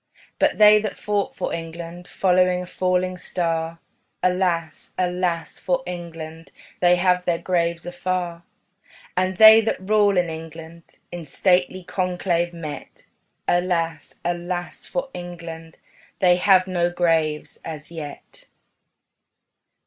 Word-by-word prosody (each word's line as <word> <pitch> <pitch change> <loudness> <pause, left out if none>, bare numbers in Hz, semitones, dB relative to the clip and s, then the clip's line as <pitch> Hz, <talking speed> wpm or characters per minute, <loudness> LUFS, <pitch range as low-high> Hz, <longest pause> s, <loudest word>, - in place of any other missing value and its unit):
But - - +2
they 210 0 +7
that 215 - -4
fought 205 -1 -1
for - - -3
England, 170 +1 -7
Following 180 -1 +2
a - - -7
falling 185 0 0
star, 165 -2 -2 0.5
Alas, 180 -3 0
alas 180 -2 -1
for 265 -1 0
England 165 -2 -7 0.3
They 175 0 +5
have 180 0 +2
their 170 -1 +1
graves 170 -1 -1
afar. 175 -1 -3 0.7
And 185 0 0
they 220 +1 +10
that 225 - -1
rule 205 0 +3
in 175 -1 +3
England, 165 +1 -9 0.3
In 175 -1 -6
stately 180 +4 +1
conclave 175 -1 -1
met, 165 -3 -8 0.4
Alas, 170 -3 0
alas 175 0 -3
for 265 0 -3
England 165 -2 -8 0.4
They 180 -2 +4
have 185 0 +5
no 175 -2 0
graves 165 -3 0
as 155 -1 -8
yet. 155 -4 -9
175 Hz, 120 wpm, -23 LUFS, 165-185 Hz, 0.7 s, they